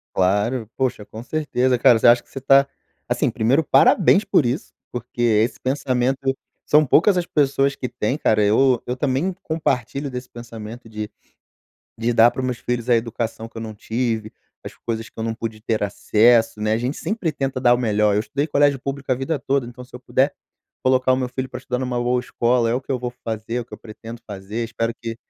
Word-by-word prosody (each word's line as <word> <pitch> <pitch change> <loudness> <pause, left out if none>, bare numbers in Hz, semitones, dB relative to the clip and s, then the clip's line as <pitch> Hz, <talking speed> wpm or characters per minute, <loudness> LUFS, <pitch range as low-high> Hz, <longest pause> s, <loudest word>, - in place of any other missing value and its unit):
Claro! 105 +5 +1
Poxa, 130 -5 -1
com 110 +2 -10
certeza, 130 -3 0
cara. 115 -1 +6
Você - - +3
acha 120 0 +6
que - - -33
você 135 - -7
tá 135 +1 +5 0.4
assim, - - +1
primeiro 130 +8 +2
parabéns 170 +9 +5
por 180 - +3
isso, 125 - -3 0.2
porque 120 0 -7
esse 115 0 +2
pensamento 135 0 0 0.3
são 150 +1 +5
poucas 185 +9 +4
as 175 -1 0
pessoas 140 -1 +1
que 125 - -4
têm, 125 +2 -2
cara, 110 -8 +2
eu 125 +4 +3
eu 125 +1 -2
também 145 +8 0
compartilho 140 -3 -2
desse 125 0 -6
pensamento 115 0 -9
de 105 -1 -6 0.9
de 115 +2 0
dar 115 +1 +6
para - - -5
os - - -2
meus 125 -2 -3
filhos 120 -1 -3
a 120 - +5
educação 115 0 -3
que 115 - -20
eu 115 - -5
não 110 -1 -6
tive, 110 0 -2 0.3
as - - -7
coisas 115 -1 -4
que - - -23
eu 110 - -2
não 115 0 -2
pude 110 -2 -6
ter 110 0 -1
acesso, 110 +2 +3
né. 105 - 0
A 110 - +2
gente 125 +5 -2
sempre 195 -7 -2
tenta 135 -2 -3
dar 120 -1 +5
o - - 0
melhor, 105 -3 +2
eu 105 - +2
estudei 140 +7 -2
colégio 145 -2 +3
público 140 0 -5
a - - +4
vida 140 +5 -2
toda, 135 -2 0
então 120 +1 -10
se - - -24
eu 125 - -6
puder 130 +3 +1 0.5
colocar 130 0 +3
o - - +3
meu 130 -1 -2
filho 130 +1 -4
para 125 -1 -7
estudar 125 -1 -3
numa 125 -2 -2
boa 125 +1 +1
escola, 120 -1 +1
é 120 - +1
o 125 - -1
que 135 - -14
eu 130 - -1
vou 125 0 -3
fazer, 110 +1 -4
é 125 - 0
o - - -6
que - - -11
eu - - -12
pretendo 115 +1 -10
fazer, 105 +3 -5
espero 115 0 -2
que 115 0 -6
125 Hz, 225 wpm, -21 LUFS, 115-135 Hz, 0.9 s, cara